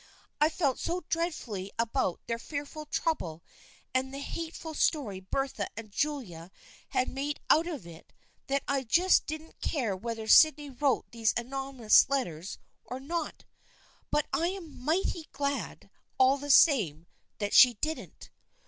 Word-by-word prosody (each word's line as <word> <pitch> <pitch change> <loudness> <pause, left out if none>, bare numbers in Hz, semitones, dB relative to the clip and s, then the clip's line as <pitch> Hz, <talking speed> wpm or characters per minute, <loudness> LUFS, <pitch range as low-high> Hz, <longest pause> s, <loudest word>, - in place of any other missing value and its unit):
I 300 - +5
felt 285 -6 0
so 345 -1 -3
dreadfully 240 - -3
about 230 -4 0
their 230 0 -3
fearful 290 +3 -6
trouble 175 - -2 0.5
and 260 +1 0
the 275 - -6
hate 325 +4 -5
ful 320 -1 -7
story 265 - 0
Bertha 270 +8 -2
and 220 -2 -8
Julia 200 - -3 0.4
had 255 - +1
made 285 +2 -3
out 325 +3 +4
of 300 - -5
it 170 -1 -13 0.4
that 275 0 0
I 275 -1 +1
just 350 +10 +3
didn't 310 +1 -7
care 240 - -1
whether 225 +2 -5
Sydney 300 +2 +6
wrote 270 0 0
those 225 -2 +1
anonymous 265 -2 +3
letters 190 - -2 0.3
or 255 - -6
not 320 +3 -4 0.3
— - - -32
but 300 - +1
I 335 - +2
am 345 -8 -7
mighty 325 +1 0
glad 280 0 -3 0.3
all 265 +2 +4
the 290 +1 -7
same 205 - +5 0.3
that 205 -1 -3
she 250 -2 +8
didn't." 310 +9 -5
275 Hz, 150 wpm, -29 LUFS, 225-310 Hz, 0.5 s, she